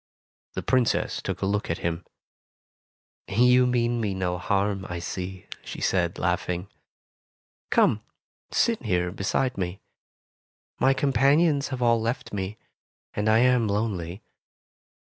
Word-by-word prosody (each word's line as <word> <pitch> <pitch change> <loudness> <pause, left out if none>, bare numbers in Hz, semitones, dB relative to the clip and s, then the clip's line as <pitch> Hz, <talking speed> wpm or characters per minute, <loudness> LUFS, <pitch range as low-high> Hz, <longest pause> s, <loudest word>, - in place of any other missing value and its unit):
The - - -4
Princess 125 -3 +1
took - - -4
a - - +3
look 100 +1 -1
at 85 - 0
him. 85 0 -1 1.2
''You 125 +4 +5
mean 120 -1 +1
me 100 -3 -1
no 90 -1 -1
harm, 100 0 0
I 85 - -3
see,'' 90 +2 -5 0.2
she - - -7
said, - - +1
laughing. 90 +2 -1 1.0
"Come, - - +3 0.5
sit 230 -2 +1
here 90 -6 0
beside 100 +6 -1
me. 90 +1 -3 1.0
My 135 0 +4
companions 140 +3 +3
have 130 -3 -3
all 115 -1 +3
left 115 0 -3
me, 100 +1 -3 0.6
and 105 +1 0
I 110 +1 +5
am 125 -3 +3
lonely. 100 -2 -2
105 Hz, 125 wpm, -26 LUFS, 95-125 Hz, 1.2 s, You